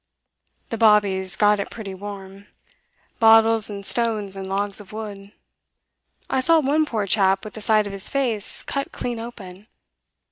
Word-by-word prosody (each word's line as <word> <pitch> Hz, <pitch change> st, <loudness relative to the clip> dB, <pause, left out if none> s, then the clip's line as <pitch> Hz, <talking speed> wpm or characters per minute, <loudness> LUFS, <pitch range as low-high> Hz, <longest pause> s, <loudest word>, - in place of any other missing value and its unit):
The 230 Hz, -, -4 dB
bobbies 200 Hz, -4 st, +3 dB
got 210 Hz, 0 st, +3 dB
it 200 Hz, -, -4 dB
pretty 205 Hz, -4 st, -8 dB
warm 195 Hz, 0 st, -9 dB, 0.7 s
bottles 225 Hz, -1 st, +5 dB
and 200 Hz, -1 st, -7 dB
stones 210 Hz, -1 st, 0 dB
and 190 Hz, -1 st, -6 dB
logs 200 Hz, +1 st, +1 dB
of 195 Hz, -, -15 dB
wood; 205 Hz, -2 st, -8 dB, 1.0 s
I 265 Hz, -, 0 dB
saw 330 Hz, +4 st, +4 dB
one 305 Hz, +2 st, +1 dB
poor 220 Hz, -7 st, -2 dB
chap 195 Hz, 0 st, +2 dB
with 215 Hz, -, -8 dB
the 220 Hz, -, -9 dB
side 215 Hz, 0 st, +2 dB
of 200 Hz, -, -6 dB
his 195 Hz, +1 st, 0 dB
face 240 Hz, -7 st, -2 dB
cut 275 Hz, 0 st, -4 dB
clean 240 Hz, -2 st, -4 dB
open. 210 Hz, -4 st, -10 dB
210 Hz, 155 wpm, -22 LUFS, 195-225 Hz, 1.0 s, bottles